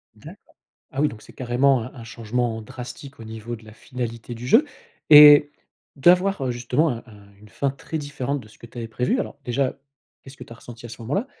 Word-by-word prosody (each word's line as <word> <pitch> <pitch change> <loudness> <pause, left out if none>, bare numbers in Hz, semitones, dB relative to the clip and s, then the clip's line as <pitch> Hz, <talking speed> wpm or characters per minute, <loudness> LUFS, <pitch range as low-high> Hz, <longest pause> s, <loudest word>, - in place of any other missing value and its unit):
D'accord. - - -12 0.6
Ah, 135 - -3
oui 150 - +3
donc 110 - -11
c'est - - -15
carrément 130 0 +1
un 125 - -9
un 120 -3 -10
changement 115 0 -3
drastique 130 +4 -10
au - - -9
niveau 110 +1 -7
de 110 - -17
la 110 - -13
finalité 120 -1 -6
du 120 +2 -8
jeu 240 - +5 0.5
et 150 0 +10 0.5
d'avoir, 180 +2 +3
heu, 125 - -1
justement, 125 +6 0
un 115 -1 -5
un 100 -2 -17
une 105 - -16
fin 140 +4 -2
très 155 +4 -6
différente 145 -1 -4
de 110 - -15
ce - - -20
que 115 - -12
tu 120 - -12
avais 115 -1 -5
prévu, 125 +3 -1
alors 140 - -5
déjà, 130 +2 -1 0.4
qu'est-ce 135 0 -13
que - - -10
tu - - -14
as - - -11
ressenti 120 0 -13
à - - -12
ce 115 - -11
moment-là? 190 - -2
125 Hz, 225 wpm, -23 LUFS, 115-140 Hz, 0.6 s, et